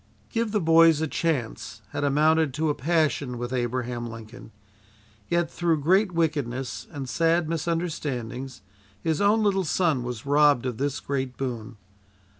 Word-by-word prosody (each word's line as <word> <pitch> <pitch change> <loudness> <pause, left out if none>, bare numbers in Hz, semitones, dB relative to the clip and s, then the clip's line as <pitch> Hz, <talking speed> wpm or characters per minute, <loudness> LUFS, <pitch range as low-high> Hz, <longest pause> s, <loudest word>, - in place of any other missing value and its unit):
"Give 230 -2 -1
the 210 - +1
boys 165 -2 +5
a 160 - 0
chance," 115 - -3
had 145 - -3
amounted 150 0 +3
to 155 0 +1
a - - 0
passion 145 -4 0
with 120 +1 -4
Abraham 120 -1 -2
Lincoln, 115 +1 -10 0.8
yet 170 -1 0
through 170 -3 +1
great 190 +5 +3
wickedness 145 -7 -2
and 140 -3 -6
sad 165 +5 +2
misunderstandings 150 - -3 0.4
his 160 - -1
own 210 +2 +4
little 195 -2 +2
son 160 -5 +1
was 120 -1 -5
robbed 145 -3 +4
of 125 -3 -3
this 140 0 -1
great 135 -2 -3
boon. 120 -3 -5
145 Hz, 145 wpm, -26 LUFS, 125-165 Hz, 0.8 s, boys